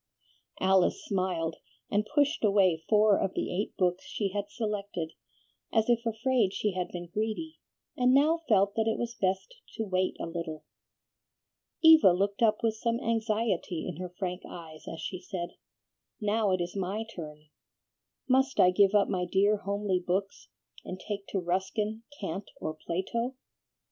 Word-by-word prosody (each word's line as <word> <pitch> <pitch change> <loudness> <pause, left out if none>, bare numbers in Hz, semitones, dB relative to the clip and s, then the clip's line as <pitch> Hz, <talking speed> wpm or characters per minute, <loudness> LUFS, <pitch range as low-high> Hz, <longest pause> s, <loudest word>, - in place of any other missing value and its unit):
Alice 190 -1 +3
smiled, 180 -4 -1 0.3
and 210 +1 +1
pushed 290 -1 +2
away 190 -6 +3
four 210 -1 +5
of 190 - -1
the - - -2
eight 200 +4 -3
books 180 -1 +1
she 200 -2 -2
had 205 +1 -3
selected, 205 -7 -3 0.6
as 225 +1 +2
if 235 0 +1
afraid 230 -2 +1
she 210 - 0
had 180 -1 -2
been 175 -1 -6
greedy, 220 - -3 0.4
and 250 0 +3
now 300 +5 +4
felt 200 -2 +4
that 225 -1 0
it - - -2
was 235 0 -3
best 190 - -1 0.2
to 225 - -2
wait 185 -1 0
a - - -3
little. 165 -2 -5 1.2
Eva 320 - +9
looked 200 +3 -1
up 215 -1 +3
with 225 -1 +2
some 230 +1 0
anxiety 220 -7 -1
in 180 -4 -5
her 180 0 -5
frank 180 -1 -3
eyes 160 -2 -10
as 165 - -7
she 180 +3 -4
said, 180 -2 -4 0.7
"Now 210 0 +1
it 185 -1 +1
is 175 +2 -4
my 195 +3 -2
turn. 150 -2 -9 0.8
Must 265 +1 +2
I 180 - +7
give 200 +2 +4
up 205 - +5
my 180 -2 -1
dear 200 +4 +3
homely 200 -2 -1
books, 195 +3 -2 0.3
and 185 - -6
take 200 -1 -5
to 195 - -1
Ruskin, 190 +5 -1 0.2
Kant, 195 +1 -4
or 155 - -3
Plato?" 190 +11 -3
200 Hz, 160 wpm, -29 LUFS, 180-220 Hz, 1.2 s, Eva